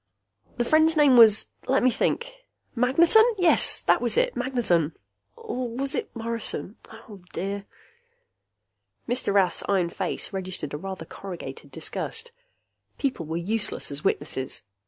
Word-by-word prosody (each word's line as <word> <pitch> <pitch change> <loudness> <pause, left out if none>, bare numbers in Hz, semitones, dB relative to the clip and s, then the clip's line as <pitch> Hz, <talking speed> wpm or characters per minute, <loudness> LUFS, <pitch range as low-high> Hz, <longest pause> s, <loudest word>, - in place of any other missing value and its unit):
"The 240 - 0
friend's 315 +3 +4
name 290 -4 +5
was 220 -3 +7 0.2
let 270 0 +2
me 255 - +4
think 480 - -1 0.4
Magneton! 330 - +5 0.6
That - - +4
was - - +2
it! - - +1
Magneton! 230 - 0 0.4
Or 250 -1 -5
was 270 +4 0
it 460 - -3
Morrison? 230 -2 -2 0.3
Oh, 205 -4 -12
dear...." 200 +1 -4 1.4
Mr. 245 -3 -1
Rath's 195 -2 +2
iron 185 -4 +1
face 190 +2 -4
registered 185 -6 -3
a - - -3
rather 190 0 -7
corrugated 185 0 -9
disgust. 465 +1 -4 0.7
People 260 - -3
were 160 +1 -3
useless 210 0 -1
as 140 +1 -6
witnesses. 135 -3 -2
225 Hz, 130 wpm, -25 LUFS, 185-265 Hz, 1.4 s, was